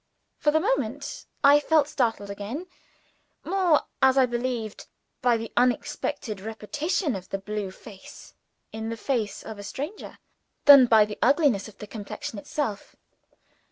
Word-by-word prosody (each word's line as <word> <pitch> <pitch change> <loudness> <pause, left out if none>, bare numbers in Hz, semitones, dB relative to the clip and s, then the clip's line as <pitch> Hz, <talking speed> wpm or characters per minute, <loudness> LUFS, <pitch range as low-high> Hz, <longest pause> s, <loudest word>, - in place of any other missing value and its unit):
For 300 - +2
the 310 +1 +3
moment 290 - -2 0.2
I 285 +1 +7
felt 300 -1 +3
startled 225 -8 -1
again 210 - -5 0.8
more, 360 -4 +2 0.2
as 265 0 +5
I 265 - +6
believe, 240 -3 -3 0.5
by 245 -2 +3
the 225 0 -6
unexpected 245 -3 -1
repetition 290 - -2
of 185 -1 -8
the 195 - -2
blue 205 0 -4
face 190 +1 -13 0.4
in 220 0 -5
the 230 - -4
face 225 -4 -2
of 220 -2 -8
a - - -7
stranger, 290 - -6 0.5
than 280 -3 +10
by 220 -2 +6
the 210 0 -8
ugliness 275 - +3
of 215 - -15
the - - -8
complexion 205 0 -7
itself. 215 -3 -4
240 Hz, 145 wpm, -26 LUFS, 210-290 Hz, 0.8 s, than